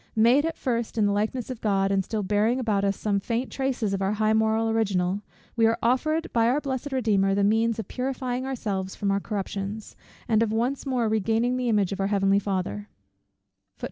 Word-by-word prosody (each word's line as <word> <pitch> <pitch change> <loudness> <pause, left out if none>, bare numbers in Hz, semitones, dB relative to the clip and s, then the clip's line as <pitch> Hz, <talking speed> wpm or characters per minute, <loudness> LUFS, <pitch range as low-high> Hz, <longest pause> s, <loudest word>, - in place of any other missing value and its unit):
Made 240 +7 +4
at 325 - -4
first 235 -3 -2
in 215 - +3
the 205 - +2
likeness 220 +5 -1
of 245 - -7
God, 195 -2 +1
and 195 -1 +2
still 210 +2 -3
bearing 210 +5 +1
about 215 -5 0
us 200 -1 0
some 205 -2 0
faint 235 +5 -2
traces 255 -6 -1
of 195 - -2
our 195 +2 +1
high 215 0 +1
original, 220 -4 +1 0.3
we 225 -2 +4
are 225 +1 +1
offered 310 +7 +1
by 230 -1 +3
our 255 +5 +2
blessed 275 -1 -4
Redeemer 205 -7 +2
the 200 - +2
means 225 +2 +2
of 220 - -5
purifying 255 -1 -3
ourselves 205 -8 -3
from 200 -1 -1
our 200 - +1
corruptions, 200 +1 -5 0.3
and 220 -1 +3
of 225 -2 +1
once 245 +6 -1
more 250 -4 +1
regaining 225 +3 +1
the 250 -1 -1
image 205 -4 +2
of 200 - -4
our 195 - +1
Heavenly 195 -1 +2
Father. 180 - -3
220 Hz, 200 wpm, -26 LUFS, 200-245 Hz, 0.3 s, Made